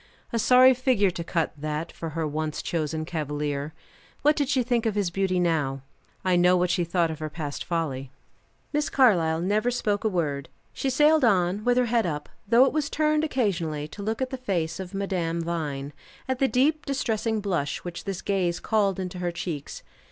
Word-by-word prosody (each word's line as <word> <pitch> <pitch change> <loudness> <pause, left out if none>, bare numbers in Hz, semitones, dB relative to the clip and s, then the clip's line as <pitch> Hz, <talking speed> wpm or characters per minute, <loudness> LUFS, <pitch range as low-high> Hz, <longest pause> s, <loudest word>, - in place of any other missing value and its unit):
A 230 - +1
sorry 255 +3 +7
figure 245 -6 +2
to 170 - -5
cut, 165 -1 -1
that, 150 +2 -4
for 165 - -6
her 165 - 0
once 155 +1 -3
chosen 155 -1 -2
cavalier. 150 -2 -3 0.5
What 300 +1 +5
did 285 -3 0
she 265 -3 +2
think 235 -1 +1
of 215 - -1
his 200 -4 0
beauty 190 0 0
now? 150 -6 0 0.4
I 185 -1 +3
know 180 +1 +5
what 180 0 +1
she 175 - +1
thought 170 -1 +1
of 160 - -7
her 155 0 -4
past 150 -2 -5
folly. 145 -6 -2 0.6
Miss 295 0 +1
Carlyle 170 -11 +3
never 210 +6 +1
spoke 210 -4 -1
a 220 - +2
word. 145 -7 -2 0.2
She 270 - -1
sailed 300 +3 +4
on, 195 -2 +2
with 245 +1 +2
her 250 - +4
head 230 -3 +1
up, 150 -2 -4 0.2
though 235 +4 +6
it - - 0
was 300 -2 0
turned 305 0 +1
occasionally 170 - -1
to 200 - -9
look 220 +5 -1
at 260 - -4
the 265 - -3
face 175 -9 -2
of 190 +1 -6
Madame 180 -4 -1
Vine, 150 -4 -3 0.3
at 260 -1 -1
the 270 - +4
deep 295 +5 +1
distressing 225 -5 -1
blush 175 -9 -2
which 175 -1 -7
this 195 -2 -4
gaze 180 -3 0
called 200 -3 +1
into 180 -1 -4
her 175 -1 -1
cheeks. 170 -4 -5
185 Hz, 195 wpm, -26 LUFS, 160-235 Hz, 0.6 s, sorry